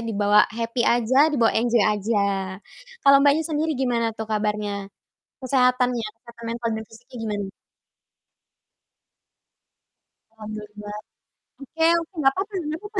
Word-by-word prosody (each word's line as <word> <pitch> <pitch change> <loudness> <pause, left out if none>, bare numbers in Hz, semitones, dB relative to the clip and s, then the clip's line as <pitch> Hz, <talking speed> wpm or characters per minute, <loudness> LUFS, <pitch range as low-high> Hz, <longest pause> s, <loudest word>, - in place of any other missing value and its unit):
dibawa 210 -2 +3
happy 230 +2 -3
aja, 245 +6 +4
dibawa 240 -7 +2
enjoy 235 -1 +2
aja. 200 -2 0 0.5
Kalau 275 0 +7
Mbaknya 290 +3 +3
sendiri 315 0 -1
gimana 235 -3 -1
tuh 220 - -4
kabarnya? 210 -2 -2 0.5
Kesehatannya, 250 -2 +2 0.2
kesehatan 235 -1 -13
mental 235 0 -3
dan 220 - -7
fisiknya 230 +3 -15
gimana? 205 -2 -3 2.8
Alhamdulillah. 210 -1 -8 0.6
Oke 320 +4 -4 0.2
oke, 335 +3 -9
nggak 270 -2 +4
papa 400 +2 -3 0.2
nggak 315 +4 -4
papa. 415 -1 -4
230 Hz, 115 wpm, -23 LUFS, 210-270 Hz, 2.8 s, Kalau